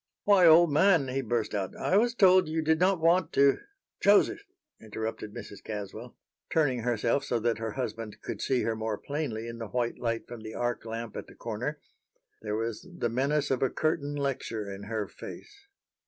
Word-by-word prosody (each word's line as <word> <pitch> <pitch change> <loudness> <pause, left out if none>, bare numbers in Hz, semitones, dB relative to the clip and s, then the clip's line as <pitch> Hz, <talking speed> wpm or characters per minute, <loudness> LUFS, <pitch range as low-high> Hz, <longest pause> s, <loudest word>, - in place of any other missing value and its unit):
"Why, 195 -4 +6
old 165 0 +7
man," 160 -4 +4
he 135 +1 -1
burst 115 -3 -1
out, 100 -2 -3
"I 185 - 0
was 235 +3 +3
told 185 -4 +6
you 160 0 -1
did 160 0 +2
not 185 0 +3
want 170 +3 +3
to" 140 0 +4 0.4
"Joseph!" 205 - +4 0.4
interrupted 110 0 -5
Mrs. 100 -1 -9
Caswell, 110 +3 -7 0.3
turning 140 -6 +2
herself 120 +3 0
so 120 -3 -1
that 115 -1 0
her 110 -1 -3
husband 115 -5 -5
could - - -5
see 130 -2 +1
her 115 - 0
more 110 -1 -2
plainly 140 -6 -4
in 115 0 -7
the 115 - -5
white 120 +1 -2
light 115 -1 -2
from 120 -2 -8
the 110 0 -8
arc 120 -1 -2
lamp 115 -1 -5
at - - -6
the - - -15
corner. - - -4 0.6
There 105 -1 -3
was 115 - -4
the 120 - 0
menace 140 +5 0
of 130 - +1
a 135 - +3
curtain 155 -2 -1
lecture 115 -7 -3
in 95 +1 -8
her 110 -2 -3
face. - - -11
120 Hz, 190 wpm, -29 LUFS, 110-155 Hz, 0.6 s, old